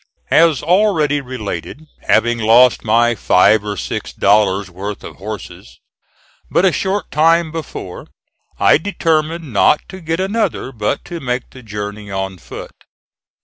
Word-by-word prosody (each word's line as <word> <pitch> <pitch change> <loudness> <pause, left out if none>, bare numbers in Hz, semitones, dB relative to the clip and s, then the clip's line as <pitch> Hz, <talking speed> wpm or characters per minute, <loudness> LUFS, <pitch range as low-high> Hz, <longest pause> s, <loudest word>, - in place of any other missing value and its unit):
As 165 -4 +4
already 165 -5 +2
related, 125 - -6 0.2
having 120 +1 +2
lost 115 +3 +5
my 115 +2 +3
"five 105 0 +3
or 105 -1 -4
six 70 - -4
dollars' 100 -2 +2
worth 100 +3 -6
of - - -10
horses" 105 +1 -9 0.7
but 185 - +2
a 190 - +4
short 195 +3 -2
time 165 +1 +3
before 155 - -7 0.5
I - - +5
determined 160 - -1
not 130 +8 +4
to 190 -1 -9
get 165 +1 -2
another, 195 - -1
but 110 +2 -2
to 170 -1 -6
make 125 -3 -3
the 130 - -12
journey 105 -2 -7
on 95 -1 -4
foot. 65 - -9
125 Hz, 140 wpm, -17 LUFS, 105-165 Hz, 0.7 s, lost